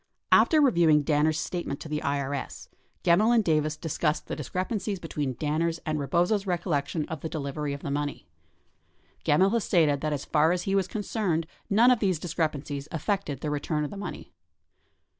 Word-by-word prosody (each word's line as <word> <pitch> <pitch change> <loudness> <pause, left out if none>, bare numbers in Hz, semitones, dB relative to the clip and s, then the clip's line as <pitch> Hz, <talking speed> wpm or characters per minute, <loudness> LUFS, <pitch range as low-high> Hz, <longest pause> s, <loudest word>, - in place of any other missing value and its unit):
After 315 - +6
reviewing 170 - +4
Danner's 155 +1 +2
statement 170 -6 -3
to - - -7
the 150 0 -2
IRS, 140 -1 -3 0.3
Gemmill 210 +8 +4
and 225 - +4
Davis 155 -3 +1
discussed 155 -1 -1
the - - -4
dis 150 -5 -7
crepancies 195 +1 -2
between 145 -6 -3
Danner's 160 +3 0
and 155 -1 -1
Rebozo's 180 +8 +1
recollection 165 -3 -1
of 160 -4 -6
the 160 - -4
delivery 145 -1 -3
of 140 0 -6
the 140 - -3
money. 145 0 -3 1.0
Gemmill 185 +7 +4
has 230 -2 +1
stated 150 -5 +2
that 155 - -1
as 145 -2 -3
far 160 +2 +3
as 180 -1 -2
he 195 - -1
was 195 -2 +2
concerned, 195 -5 -1 0.2
none 230 +5 +5
of 250 - +3
these 190 -5 +1
discrepancies 150 -4 -3
affected 160 - -2
the 150 - -2
return 150 +1 -1
of 150 - -4
the - - -7
money. 205 - -7
160 Hz, 180 wpm, -27 LUFS, 150-185 Hz, 1.0 s, After